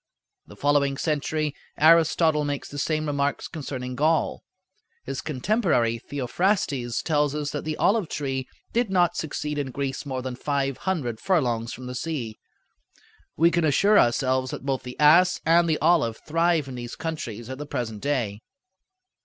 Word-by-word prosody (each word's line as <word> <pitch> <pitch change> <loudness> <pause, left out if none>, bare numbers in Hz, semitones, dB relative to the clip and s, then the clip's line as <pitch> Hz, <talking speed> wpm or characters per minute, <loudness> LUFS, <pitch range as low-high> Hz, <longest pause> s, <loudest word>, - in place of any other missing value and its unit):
The - - -13
following 140 -1 +2
century 155 0 -1 0.2
Aristotle 160 -1 +4
makes 145 -1 -3
the 145 - -6
same 155 +1 0
remarks 140 -1 -1
concerning 130 -5 -5
Gaul. 155 +4 +1 0.6
His 135 -1 -4
contemporary, 150 - +1
Theophrastes, 135 - -1
tells 150 -2 +1
us 150 -1 -2
that 145 - -4
the 155 -1 -3
olive 205 -5 +2
tree 135 -3 -3 0.3
did 235 -2 +1
not 175 -2 +2
succeed 150 -2 -3
in 140 -2 -2
Greece 135 0 -3
more 130 -3 -4
than 130 -1 -4
five 135 0 -1
hundred 125 -12 -2
furlongs 120 -11 0
from 130 - -8
the 125 - -5
sea. 125 -6 -4 1.0
We 170 +2 +5
can 170 -1 +1
assure 200 +8 +4
ourselves 130 +1 +2
that - - -7
both 135 -2 -1
the 125 0 -9
ass 170 +5 +6
and 170 +1 +4
the 155 - +2
olive 155 -9 +2
thrive 165 -2 +1
in 130 - -7
these 120 -1 -6
countries 120 -9 -5
at 130 +1 -7
the 150 - -6
present 115 -7 -4
day. 115 -8 -1
145 Hz, 160 wpm, -25 LUFS, 130-160 Hz, 1.0 s, ass